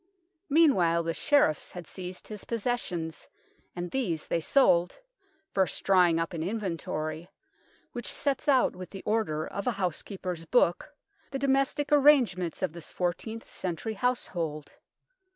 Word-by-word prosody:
Meanwhile 190 - +4
the 165 0 -1
Sheriffs 280 - +2
had 180 -2 -7
seized 180 +2 -8
his 210 -2 -8
possessions 200 -9 -3 0.5
and 175 0 -4
these 185 -13 -1
they 170 - 0
sold, 175 - +3 0.5
first 190 -6 +1
drawing 180 -4 +4
up 165 +2 -2
an 165 - -3
inventory, 165 -4 -3 0.6
which 240 -2 -6
sets 280 -1 -1
out 265 -3 +4
with 180 -1 -8
the 195 - -9
order 205 -9 0
of 200 +3 -5
a - - +4
housekeeper's 180 -2 -4
book 175 - +2 0.4
the 275 - -3
domestic 275 +2 +1
arrange 285 -7 +6
ments 175 -3 -4
of - - 0
this 170 -2 -9
fourteenth 185 +6 -3
century 185 +4 -4
household. 175 -10 -2
185 Hz, 135 wpm, -28 LUFS, 170-245 Hz, 0.6 s, arrange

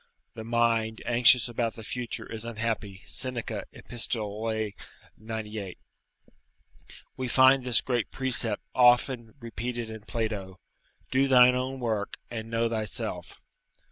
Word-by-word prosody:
["The 110 - -8
mind 115 -1 0
anxious 120 +1 +5
about 115 -1 -2
the 115 - -10
future 120 +2 -4
is 110 -1 -6
unhappy." 110 -4 -4
Seneca, 125 -3 -2
Epist., 120 0 -3
98.] 110 -1 -6 1.4
We 130 -1 -4
find 130 +1 +5
this 125 -2 +2
great 120 -4 -2
precept 125 -5 +5
often 120 -1 +3
repeated 115 0 -5
in 110 -1 -9
Plato, 105 -4 -4 0.5
"Do 135 +1 +2
thine 125 -1 +6
own 130 +1 -3
work, 110 -4 -3
and 115 -1 -6
know 115 0 0
thyself." 110 -2 -4
115 Hz, 115 wpm, -27 LUFS, 110-125 Hz, 1.4 s, thine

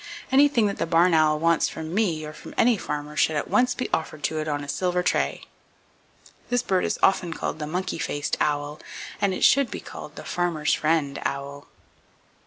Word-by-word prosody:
Anything 270 -4 +5
that 200 - -1
the - - 0
barn 170 +2 +4
owl 155 -1 +4
wants 165 +1 +2
from 160 +1 -6
me, 175 -7 0
or 150 - -8
from - - -11
any 240 0 +4
farmer, 150 -5 -5
should 155 - +2
at 145 - -1
once 250 0 +2
be 255 - -2
offered 155 -2 -2
to 155 - -1
it, 155 - -3
on 145 -1 -2
a - - -8
silver 180 +4 0
tray. - - 0 1.1
This 245 0 +1
bird 185 -2 +1
is - - -1
often 180 -3 +3
called - - -4
the 150 - -4
Monkey 180 +2 -3
Faced 145 -1 -2
Owl, 145 0 -1 0.4
and 200 -1 +2
it 185 - -3
should 275 -2 +5
be - - -5
called - - -10
the - - -8
Farmer's 170 -4 0
Friend 155 -3 0
Owl. 140 +1 -4
160 Hz, 195 wpm, -25 LUFS, 150-190 Hz, 1.1 s, Anything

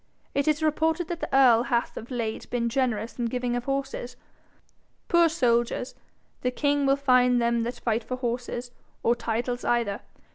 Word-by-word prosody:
It 280 +1 0
is 305 +1 +2
reported 320 +2 +1
that 345 -1 -3
the - - -4
earl 255 -4 +6
hath 240 -1 -1
of 230 - -8
late 230 -4 -4
been 235 -1 0
generous 235 -2 -1
in 240 - 0
giving 245 +1 -1
of 245 0 -3
horses. 275 -2 -3 0.9
Poor 340 -1 +5
soldiers 245 -5 0 0.5
the 250 - +1
king 285 +2 +1
will 275 - +5
find 250 -3 +4
them 235 0 +1
that 240 +2 -3
fight 230 0 0
for 255 - -4
horses, 245 0 -3 0.3
or 235 - +4
titles 240 +1 -2
either. 235 -4 0
245 Hz, 170 wpm, -26 LUFS, 235-275 Hz, 0.9 s, earl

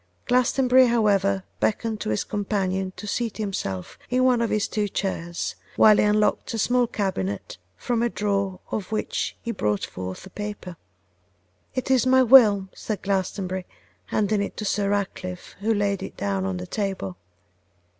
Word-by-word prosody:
Glastonbury, 255 0 +4
however, 200 -4 +2 0.2
beckoned 220 0 0
to - - -2
his 110 - 0
companion 195 -2 -1
to - - -8
seat 225 +1 -2
himself 145 - -4
in 255 +1 +2
one 250 -2 +4
of 230 - +1
his 210 -1 +1
two 210 -1 -1
chairs, 175 -3 -3 0.2
while 215 -1 +7
he - - +4
unlocked 210 0 +2
a - - -2
small 245 +3 +2
cabinet, 100 - -3 0.2
from 235 - -1
a 240 - +2
drawer 200 -3 -1
of 205 -1 -3
which 215 - -2
he 235 - -2
brought 105 - -1
forth 95 - -7
a 190 - -12
paper. 205 -3 -6 1.0
'It 260 0 -1
is 260 -1 +4
my 260 0 +6
will,' 215 -6 +7
said 210 -4 -5
Glastonbury, 190 -1 -2 0.4
handing 210 -1 +1
it 200 - -4
to 215 - -4
Sir 200 0 0
Ratcliffe, 185 -3 -3
who 215 +3 0
laid 205 -2 +1
it - - -7
down 100 -1 -1
on 95 -1 -2
the 90 - -5
table. 190 - -3
205 Hz, 165 wpm, -24 LUFS, 185-225 Hz, 1.0 s, while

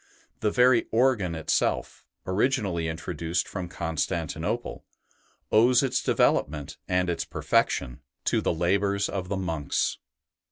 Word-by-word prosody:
The 105 - +1
very 125 +2 +4
organ 110 -8 +2
itself, 80 - -1 0.2
originally 95 -5 0
introduced 85 +1 -2
from 90 -3 -5
Constantinople, 80 -1 -3 0.7
owes 120 +4 +5
its 135 - 0
development 75 -2 +1
and 90 0 +1
its 85 - -1
perfection 60 -3 0 0.2
to - - +2
the - - +1
labours 100 +4 +1
of 95 -2 -4
the 100 - -1
monks. 80 -6 -1
90 Hz, 115 wpm, -26 LUFS, 80-105 Hz, 0.7 s, owes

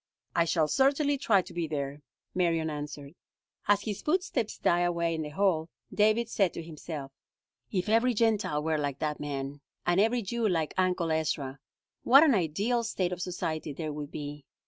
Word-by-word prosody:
"I 170 - +4
shall 160 -2 +2
certainly 280 - +3
try 200 -7 +3
to 175 - -12
be 170 -1 -2
there," 145 -1 -4 0.3
Marion 165 -3 +1
answered. 145 -1 -6 0.5
As 205 0 +4
his 210 -3 -4
footsteps 305 - 0
died 175 - +2
away 170 -1 0
in 160 - -2
the 150 - -4
hall, 165 -1 +1 0.2
David 215 +2 +3
said 195 -5 +1
to 165 - -5
himself: 155 -3 -7 0.6
"If 185 -2 -1
every 230 +3 +3
Gentile 210 -9 +1
were 160 -1 0
like 140 -2 -2
that 150 0 -2
man, 140 -1 -4 0.2
and 175 +2 +3
every 230 +2 +2
Jew 230 +3 0
like 165 -4 0
Uncle 180 -3 +1
Ezra, 145 -4 -1 0.4
what 275 +5 +7
an 305 -5 +5
ideal 205 +7 +1
state 190 -5 -1
of 180 0 -4
society 160 -4 -3
there 155 +1 -4
would 145 -1 -5
be! 145 -1 -6
170 Hz, 175 wpm, -29 LUFS, 150-210 Hz, 0.6 s, what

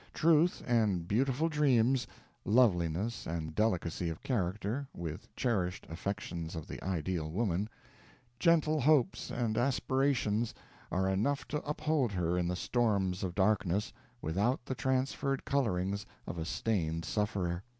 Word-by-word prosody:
Truth, 165 +2 +3
and 105 -8 +2
beautiful 135 - +2
dreams 130 -6 +3 0.4
loveliness, 100 -2 +2
and 80 -1 -3
delicacy 90 -4 0
of 80 - -7
character, 110 +4 -1
with 80 -3 -5
cherished 95 -7 -1
affections 85 -2 -4
of 80 -2 -5
the - - -8
ideal 85 -3 -2
woman 100 +2 0 0.7
gentle 155 -1 +3
hopes 145 -2 +3
and 115 -2 0
aspirations, 125 -4 +1 0.4
are 95 +1 +1
enough 110 +10 0
to 150 - -1
uphold 150 -4 0
her 90 -2 0
in 90 -1 +1
the 90 - -1
storms 100 -5 +1
of 90 -2 -3
darkness, 100 -1 +1 0.3
without 105 - 0
the 130 - -2
transferred 130 +2 0
colorings 100 -7 0 0.2
of 85 - -5
a 80 - -2
stained 80 -5 -1
sufferer. 95 -3 -1
105 Hz, 130 wpm, -32 LUFS, 90-130 Hz, 0.7 s, Truth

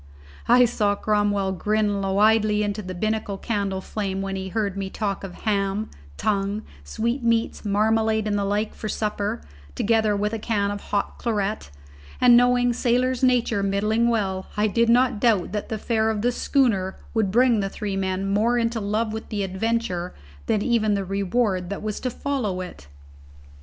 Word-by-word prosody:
I 245 +1 +6
saw 210 -3 +1
Cromwell 205 -2 +1
grin 210 +1 0
widely 210 +2 +3
into 205 0 -2
the 185 -2 -7
binnacle 215 +1 -2
candle 200 -3 -2
flame 195 -1 -3
when 195 0 -3
he 190 0 -4
heard 205 -1 -1
me 195 -1 -3
talk 200 -1 -3
of 190 -2 -7
ham, 200 -1 -1 0.3
tongue, 205 0 -1 0.2
sweetmeats, 230 - -1
marmalade 220 +1 +1
and 210 -1 0
the 200 - 0
like 205 +2 -1
for 215 - -6
supper, 205 - -2 0.3
together 220 -1 +2
with 210 +2 -1
a 225 - -2
can 205 -2 0
of 205 0 -5
hot 205 - -2
claret, 210 - -2 0.5
and 245 -1 +7
knowing 245 0 +4
sailor's 250 +1 +1
nature 245 -5 +2
middling 210 +4 +1
well, 195 -5 -1
I 210 - +3
did 230 +2 +2
not 245 -1 +3
doubt 215 -8 +2
that 210 0 -4
the 220 - -2
fare 220 0 0
of 215 -1 -2
the 245 - +3
schooner 225 -8 +1 0.2
would 220 -4 +1
bring 240 +2 +4
the 195 -1 -1
three 200 0 -4
men 190 0 -1
more 215 +5 +2
into 230 -1 0
love 215 +2 -1
with 220 - -6
the 205 -2 -2
adventure 190 -2 -2 0.3
than 210 -2 +1
even 215 -4 +2
the 195 -1 -2
reward 195 -1 0
that 200 - -5
was 215 -1 -3
to 255 - -2
follow 245 -8 -2
it. 175 - -9
210 Hz, 175 wpm, -24 LUFS, 195-230 Hz, 0.5 s, and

